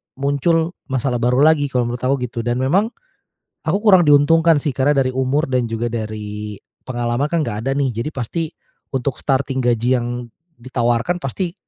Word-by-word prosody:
muncul 145 +5 +1 0.2
masalah 130 -2 -1
baru 125 +3 +3
lagi. 155 -2 +4
Kalau 125 -2 0
menurut 120 +1 -3
aku 130 +2 +1
gitu 120 -1 -4
dan 120 +1 -1
memang 140 - +2 0.7
aku 160 +5 0
kurang 185 -7 +6
diuntungkan 160 +3 +5
sih, 145 -1 -1
karena 140 +3 +2
dari 130 -1 +2
umur 130 +4 +1
dan 125 -4 -1
juga 115 +1 -2
dari 105 -2 -5 0.2
pengalaman 120 +3 -2
kan 165 -2 0
nggak 105 +1 -3
ada - - +1
nih. 135 -3 0
Jadi, 115 +7 -3
pasti 155 +4 -3 0.4
untuk 135 0 -3
starting 135 -1 0
gaji 120 +1 +2
yang 120 - -3 0.5
ditawarkan 120 +7 -1
pasti 170 +6 -3
130 Hz, 170 wpm, -19 LUFS, 120-150 Hz, 0.7 s, kurang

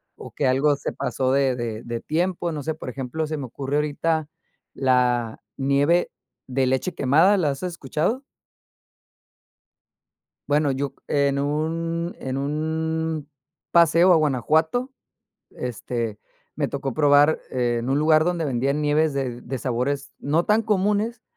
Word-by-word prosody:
o, - - -10
que 140 - 0
algo 140 +3 +3
se 140 - -5
pasó 130 -1 -1
de 135 -2 +2
de 115 -2 -4
de 120 0 -4
tiempo, 175 +1 -1
no 150 - -4
sé, 160 -1 -2
por 140 - -7
ejemplo, 135 +5 -3
se 155 0 -3
me 135 - -4
ocurre 135 +4 -3
ahorita, 150 +1 0 0.5
la 125 -3 +1 0.2
nieve 140 +6 +2 0.4
de 130 0 0
leche 130 +7 0
quemada, 160 +10 +4
¿la 155 -5 +1
has 140 +4 -4
escuchado? 170 - -2 2.3
Bueno, 145 -1 +2
yo 140 +1 -2 0.2
c 140 -1 +2
en 140 - -1
un 165 +4 -2
en 130 0 -3
un 160 +1 -2 0.4
paseo, 170 +2 +6
a - - +6
Guanajuato, 160 - +1 0.6
este, 115 -2 -4 0.4
me - - -1
tocó 135 -1 -3
probar, 145 +2 +4
eh, 120 -2 0
en 115 +2 -4
un 135 +2 +2
lugar, 155 0 +4
donde 175 -2 0
vendían 140 +2 0
nieves 150 0 +2
de 125 -3 -3
de 130 +2 -5
sabores, 130 +3 -2
no 155 +4 +1
tan 215 +1 +3
comunes, 210 +3 0
145 Hz, 145 wpm, -23 LUFS, 130-160 Hz, 2.3 s, paseo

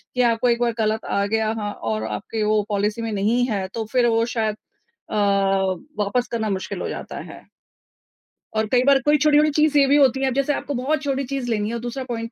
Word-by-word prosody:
कि 250 - +2
आपको 235 0 +2
एक 235 0 +2
बार 235 -1 +1
गलत 220 0 0
आ 200 - 0
गया 220 +1 0
हाँ 205 -1 -3
और 110 - -3
आपके 110 - -3
वो 215 0 +2
पॉलिसी 210 +2 -1
में 225 -1 -3
नहीं 215 +4 +1
है 195 -3 -2
तो 225 -1 -3
फिर 250 -2 +3
वो 230 0 +2
शायद 220 -2 0 0.5
अ, - - -4 0.9
वापस 240 +5 -1
करना 220 -2 -1
मुश्किल 190 -1 -3
हो - - -2
जाता - - -6
है। - - -14 1.1
और 220 0 +1
कई 250 -1 +4
बार 275 0 +5
कोई 295 0 +5
छोटी-छोटी 300 +1 +4
चीज़ 300 0 +2
ये 280 - +6
भी 280 - +4
होती 265 -2 +4
है, 270 - +2
अब 260 - 0
जैसे 275 +2 +1
आपको 285 - -4
बहुत 280 +4 -1
छोटी 275 -1 -1
चीज़ 265 -1 -4
लेनी 210 -1 0
है - - -4
और - - -3
दूसरा 245 +3 -4
पॉइंट 230 -1 -4
235 Hz, 230 wpm, -22 LUFS, 215-270 Hz, 1.1 s, ये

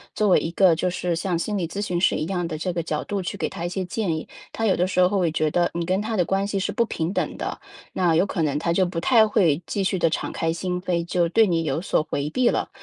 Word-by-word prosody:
作 210 -2 +2
为 - - +6
一 165 - -3
个 180 -1 +5
就 180 - 0
是 175 -1 -2
像 175 -1 -1
心 205 +4 -2
理 170 -3 -1
咨 200 +5 -5
询 180 -4 -1
师 180 - +3
一 155 - -2
样 175 -3 -2
的， 155 -2 -4
这 180 +3 -2
个 170 -1 -2
角 155 -1 -2
度 200 -2 -3
去 180 - -4
给 - - -2
她 170 - -6
一 - - -2
些 190 +1 -3
建 180 -2 -2
议， 160 - -6 0.2
她 225 - -2
有 195 - +2
的 180 +1 +2
时 185 -1 +1
候 190 +2 +3
会 175 -3 +2
觉 155 -1 0
得 175 -1 +2
你 170 0 -2
跟 185 +3 0
她 220 +1 -3
的 180 - +3
关 195 +3 0
系 200 -1 -2
是 200 +2 -1
不 235 +3 +1
平 165 -5 -3
等 - - -2
的， - - -5 0.3
那 175 -3 +2
有 175 - +4
可 180 -4 -2
能 145 -1 0
她 170 +1 -1
就 185 +2 +3
不 170 -1 -3
太 225 -1 +5
会 175 -8 +2
继 200 - -1
续 190 -1 0
地 165 - +3
敞 - - -3
开 165 0 -1
心 180 +1 -3
扉， 175 -2 -1
就 175 -1 +1
对 220 +6 +4
你 165 -2 +1
有 160 +1 -1
所 170 - +1
回 145 +1 -2
避 250 +8 +1
了。 - - 0
180 Hz, 325 characters per minute, -23 LUFS, 165-195 Hz, 0.3 s, 为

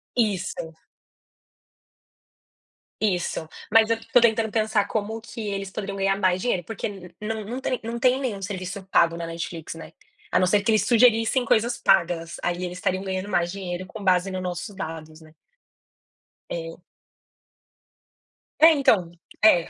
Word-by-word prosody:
Isso. 190 -7 -1 2.3
Isso, 180 -5 -1 0.2
mas 225 0 +6
eu 230 - +2 0.2
tô 245 - +7
tentando 220 -2 +3
pensar 215 -2 +1
como 220 +1 -2
que 230 - -10
eles 195 -1 -4
poderiam 200 -2 -5
ganhar 195 0 +2
mais 185 -1 +2
dinheiro. 190 -8 0
Porque 225 +4 -4
n 180 -4 -10
não 220 0 -3
não 245 +4 -4
tem 255 - -1
não 230 +1 -4
tem 255 +1 +3
nenhum 220 -8 -3
serviço 185 0 -5
pago 170 0 +4
na 170 - -4
Netflix, 165 -1 -6
né, - - -10 0.4
a - - +3
não 185 - +4
ser 205 +2 +3
que 205 - -2
eles 215 - +3
sugerissem 235 +1 +4
coisas 235 +2 +2
pagas, 170 -3 +2
aí 175 +1 -1
eles 180 0 -4
estariam 185 +1 -1
ganhando 190 +1 -3
mais 175 -2 +1
dinheiro 185 -2 -5
com 210 0 -9
base 185 0 +3
nos 185 0 -3
nossos 180 +3 -5
dados, 160 -4 -7
né. 155 0 -17 1.2
É. 165 +1 -6 1.8
É, 325 +1 +9
então, 205 - +3 0.3
é. 175 -6 +5
195 Hz, 155 wpm, -24 LUFS, 175-220 Hz, 2.3 s, É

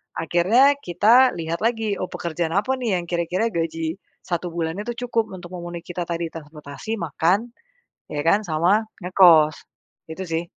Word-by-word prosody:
Akhirnya 220 - +3
kita 225 +7 +4
lihat 165 0 -3
lagi, 225 -3 0
oh - - -1
pekerjaan 170 -1 -3
apa, 235 +7 +1
nih 215 -7 0
yang - - -9
kira-kira 175 +5 0
gaji 165 0 -2 0.3
1 175 0 -2
bulannya 165 +3 -3
tuh 240 - -2
cukup 225 -3 0
untuk 175 -2 -9
memenuhi 175 0 -7
kita 175 0 -4
tadi, 170 -1 -2
transportasi, 150 +6 -7
makan, 175 +8 0 0.6
ya 145 -1 -2
kan, 200 +5 +4
sama 175 +7 +2 0.2
ngekos. 170 -5 +6 0.5
Gitu, 185 +4 -6
sih. 165 +1 -1
175 Hz, 155 wpm, -22 LUFS, 165-205 Hz, 0.6 s, ngekos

